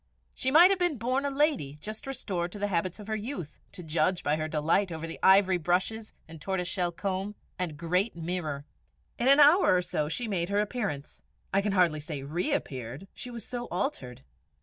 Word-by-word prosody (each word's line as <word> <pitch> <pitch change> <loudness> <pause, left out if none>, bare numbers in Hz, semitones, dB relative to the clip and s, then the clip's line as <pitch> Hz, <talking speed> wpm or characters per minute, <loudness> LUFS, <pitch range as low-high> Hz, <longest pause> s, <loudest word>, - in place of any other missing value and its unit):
She 260 - -1
might 340 +7 +8
have 390 - +1
been 350 -2 +2
a - - -7
born 265 +4 -1
lady 275 - +1
just 215 - -6
restored 180 -10 -3
to - - -7
the 205 0 -1
habits 180 +1 -1
of 210 - -9
her 220 +1 -2
youth, 210 - -6
to 180 - -9
judge 165 +3 0
by 145 +1 +2
her 155 0 -2
delight 160 +5 +1
over 160 0 -5
the 165 - -7
ivory 190 -1 +5
brushes 190 +6 -1 0.2
and 160 -1 -12
tortoise 190 -2 -2
shell 180 -2 -1
comb, 195 +3 -3 0.2
and 170 -5 -3
great 180 +6 0
mirror. 160 -4 -3 0.5
In 240 - +1
an 275 +2 +7
hour 300 - +7
or 180 - +3
so 150 -3 -2
she 235 +9 -2
made 180 -4 -1
her 200 +1 +1
appearance 210 - -3 0.3
I 195 - +4
can 200 0 -1
hardly 175 -5 +3
say 150 -2 -5
reappeared, 145 - -3
she 250 - -6
was 235 -3 -7
so 245 -1 -5
altered. 125 - -3
185 Hz, 200 wpm, -29 LUFS, 160-225 Hz, 0.5 s, might